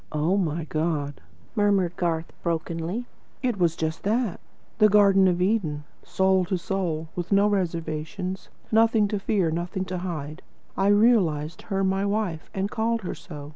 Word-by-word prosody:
"Oh, 155 +5 +1
my 170 -4 0
God," 155 -2 -2 0.3
murmured 200 -5 +2
Garth 165 -2 -2
brokenly, 170 +6 -2 0.4
"it 245 -6 0
was 170 -2 +2
just 160 0 -3
that! 220 -1 0 0.4
The 215 -1 +7
Garden 195 -2 +5
of 180 0 +2
Eden, 180 -8 0 0.2
soul 190 0 +2
to 185 +1 -1
soul, 170 -4 -2
with 175 +1 -4
no 200 +1 +5
reservations, 180 -1 -3 0.2
nothing 225 -1 +4
to 210 - -1
fear, 195 -5 +1
nothing 175 +3 -3
to 185 0 -4
hide. 160 -3 -5 0.3
I 195 - +1
realised 200 -8 +3
her 195 -1 0
my 190 +1 +1
WIFE, 200 -5 -2
and 195 +1 -2
called 230 0 0
her 180 - -3
so. 145 -4 -9
185 Hz, 155 wpm, -25 LUFS, 165-205 Hz, 0.4 s, The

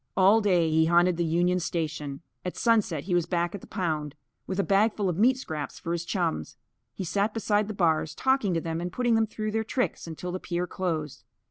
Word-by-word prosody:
All 200 +4 +6
day 180 -5 +3
he 160 +1 +4
haunted 175 +1 +4
the 175 - +1
Union 175 +2 +2
Station. 155 -3 -3 0.2
At 180 - -5
sunset 210 - +2
he 185 - -2
was 175 -1 +2
back 175 -1 0
at 200 - -6
the - - -13
pound, 155 -5 -2 0.3
with 190 0 -3
a - - +3
bagful 205 +1 +2
of 175 - -1
meat 250 +4 +5
scraps 155 - -5
for 165 - -5
his 170 0 -2
chums. 125 - -2 0.4
He - - -4
sat 200 +5 0
beside 210 -2 +1
the 215 - -5
bars, 160 -4 +1
talking 260 -9 +1
to 165 - 0
them 165 0 -3
and 175 +1 -3
putting 240 +3 +1
them 225 -1 +3
through 215 0 -4
their 220 +1 0
tricks 245 -4 -2
until 165 +2 -5
the 185 - -3
pier 175 0 -2
closed. 160 -6 -3
180 Hz, 220 wpm, -27 LUFS, 165-205 Hz, 0.4 s, All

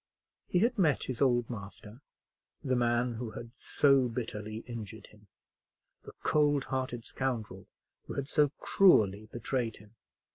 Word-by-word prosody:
He - - 0
had 230 +4 +2
met 155 -7 +3
his 130 -1 -5
old 120 -3 +3
master, 105 +2 -9 0.6
the 130 -2 +1
man 120 0 +1
who 115 0 -5
had 115 +1 -8
so 140 -3 +3
bitterly 110 -2 -5
injured 110 -2 -7
him; 105 -1 -21 0.8
the - - -10
cold 145 -2 +3
hearted 130 -3 -3
scoundrel 125 -5 -4 0.4
who - - -6
had 140 -1 -3
so 150 0 +3
cruelly 110 - +3
betrayed 120 -1 -2
him. 105 +1 -17
120 Hz, 140 wpm, -31 LUFS, 110-135 Hz, 0.8 s, met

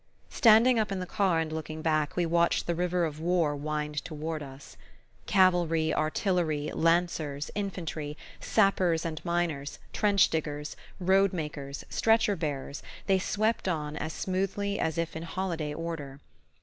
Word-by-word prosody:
Standing 230 0 +6
up 215 -2 0
in 195 - -2
the 180 - -3
car 190 -2 +1
and 160 -1 -2
looking 155 0 -5
back, 155 -3 +1
we 175 - +1
watched 170 +1 +2
the 170 - 0
river 175 0 0
of 155 -1 -5
war 165 -3 +1
wind 150 0 -3
toward 155 0 -4
us. 135 -1 -10 0.5
Cavalry, 175 -5 +3
artillery, 155 -2 0
lancers, 165 -4 0
infantry, 165 -7 -4 0.2
sappers 185 -6 +2
and 160 -2 -4
miners, 170 -5 -1 0.2
trench 205 -2 +3
diggers, 150 -2 -3 0.2
road 190 +1 +3
makers, 145 -4 -5
stretcher 225 -2 +3
bearers, 145 -4 -4 0.2
they 190 -1 +3
swept 215 +3 0
on 150 -4 -2
as 155 +1 -3
smoothly 195 +3 -2
as 160 0 -1
if 165 -1 -2
in 160 - -4
holiday 170 -3 -3
order. 150 -4 -5
165 Hz, 145 wpm, -29 LUFS, 150-185 Hz, 0.5 s, Standing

